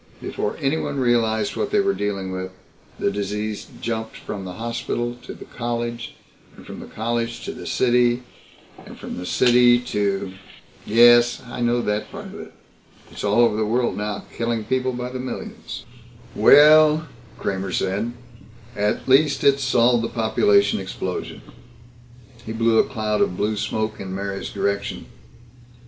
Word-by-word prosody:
Before 105 - -3
anyone 140 -1 -1
realized 115 -4 +1
what - - -1
they 210 - +2
were 195 0 +2
dealing 100 - -3
with, 95 0 -4 0.5
the - - 0
disease 105 +1 -3
jumped 110 -1 -3
from 95 -2 -6
the 90 - -6
hospital 120 +2 -3
to - - -9
the - - -11
college, 120 0 -4 0.4
and - - -14
from - - -9
the - - -9
college 115 +1 -3
to - - -3
the - - -9
city, 125 0 +2 0.6
and - - -12
from - - -7
the 90 0 -6
city 120 -1 +5
to 100 -5 -2 0.3
" - - -27
"Yes, 120 +2 +6
I 120 0 -7
know 120 0 +1
that 105 0 -2
part - - -8
of - - -9
it. - - -10 0.6
It's - - -8
all 105 +3 +3
over 115 -3 +4
the 110 - 0
world 120 +2 0
now 105 0 -4
killing 115 -1 -1
people 130 +2 0
by 125 0 -4
the 130 - -5
millions." 130 0 -7 0.5
"Well," 155 +1 +7 0.3
Kramer 95 -1 -3
said, 100 +6 -1 0.6
"at 105 0 -1
least 140 +2 +4
it's 140 0 +4
solved 120 -2 +3
the 115 - -2
population 105 -3 +2
explosion." 95 -1 -5 1.0
He 110 - -6
blew 115 0 +3
a - - +4
cloud 110 -4 -1
of 90 - +1
blue 105 +1 0
smoke 110 +1 -2
in 95 -1 -5
Mary's 100 0 -4
direction. 100 0 -2
115 Hz, 160 wpm, -22 LUFS, 105-120 Hz, 1.0 s, Well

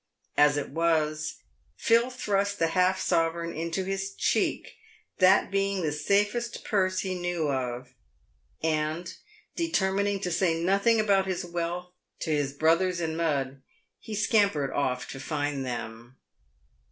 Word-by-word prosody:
As 145 0 +5
it 145 - -3
was, 155 -1 0 0.4
Phil 235 +1 +3
thrust 200 -5 -1
the 165 - +1
half 185 +2 +2
sovereign 170 -1 0
into 170 +4 -2
hi§ 195 0 -3
cheek, - - 0 0.4
that 185 +2 +5
being 195 -1 0
the 155 - 0
safest 205 +10 0
purse 185 -3 +1
he 190 -1 -2
knew 175 -4 -1
of, 125 -1 -3 0.7
and, 155 +2 -1 0.4
determining 200 - 0
to 180 - -2
say 170 0 +2
nothing 200 +6 +3
about 200 -3 +3
his 185 -2 -2
wealth 175 +1 -4 0.3
to 160 - -2
his 145 -2 +1
brothers 165 +5 +2
in 160 -2 -2
mud, 140 -5 -1 0.4
he 220 - -7
scampered 200 - +2
off 125 -3 -1
to 135 - -7
find 145 -1 -2
them. 120 0 -6
170 Hz, 135 wpm, -27 LUFS, 150-195 Hz, 0.7 s, As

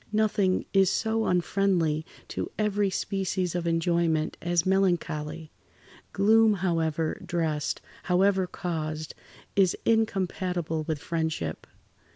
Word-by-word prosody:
"Nothing 210 -3 +1
is 195 -2 +5
so 225 +2 0
unfriendly 180 -3 +1 0.3
to - - -3
every 210 -1 +1
species 185 -2 -1
of 175 -1 -2
enjoyment 165 -1 +1
as 175 0 +1
melancholy. 165 -5 0 0.6
Gloom, 220 +2 +5
however 165 -4 -1
dressed, 165 -5 -1 0.2
however 190 +1 +3
caused, 155 -3 -4 0.4
is 190 -3 +3
incompatible 185 -7 0
with 160 -2 -1
friendship. 160 - -3
180 Hz, 100 wpm, -27 LUFS, 160-195 Hz, 0.6 s, is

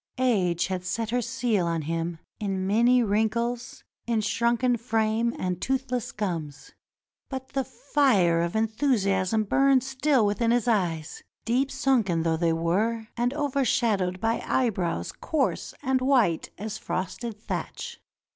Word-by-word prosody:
Age 195 -10 +2
had 185 0 -3
set 225 +4 -2
her 245 +1 +1
seal 220 -6 0
on 165 -2 -1
him 165 +2 -2 0.2
in 195 -2 -2
many 235 +5 +4
wrinkles, 235 +3 -1 0.2
in 230 -2 +1
shrunken 235 +3 +1
frame 225 0 0
and 180 -1 -2
toothless 255 -3 -1
gums; 165 -8 -4 0.6
but 265 -1 -6
the 270 -1 -1
fire 215 - +2
of 170 +3 -2
enthusiasm 220 -3 +1
burned 270 +4 +3
still 270 -2 +2
within 210 +3 +1
his 240 0 +2
eyes, 175 -9 0 0.2
deep 255 +4 +1
sunken 215 -14 +1
though 165 -1 +1
they 165 0 +2
were 210 +8 0
and 240 +1 +1
overshadowed 235 -10 +1
by 225 +2 0
eyebrows 185 - 0
coarse 300 -4 -1
and 260 0 +1
white 250 - +2
as 215 +1 -5
frosted 205 +4 -4
thatch. 475 - -5
220 Hz, 135 wpm, -26 LUFS, 185-250 Hz, 0.6 s, many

